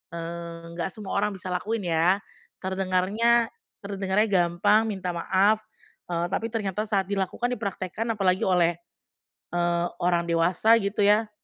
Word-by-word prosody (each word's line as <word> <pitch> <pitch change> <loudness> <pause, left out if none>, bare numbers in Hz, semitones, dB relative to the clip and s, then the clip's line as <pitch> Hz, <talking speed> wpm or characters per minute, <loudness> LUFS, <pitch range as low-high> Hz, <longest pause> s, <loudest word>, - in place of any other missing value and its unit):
eee, 170 0 -6 0.2
nggak 170 - 0
semua 210 -3 -7
orang 205 0 0
bisa 185 -1 -7
lakuin 195 0 -2
ya 180 +5 +3 0.4
terdengarnya 195 +5 +2 0.3
terdengarnya 200 +1 0
gampang 195 +5 +3
minta 190 -4 -3
maaf, 195 +5 +2 0.5
eee, 170 0 -1
tapi 225 +3 -1
ternyata 210 -2 -2
saat 200 -2 +1
dilakukan 200 +5 -2
dipraktekkan 200 0 -3
apalagi 190 -1 +1
oleh, 175 -2 +2 0.7
eee, 175 0 +1 0.2
orang 175 -1 +2
dewasa 170 +6 +3
gitu 200 +1 0
ya. 210 +1 +4
190 Hz, 130 wpm, -26 LUFS, 175-210 Hz, 0.7 s, ya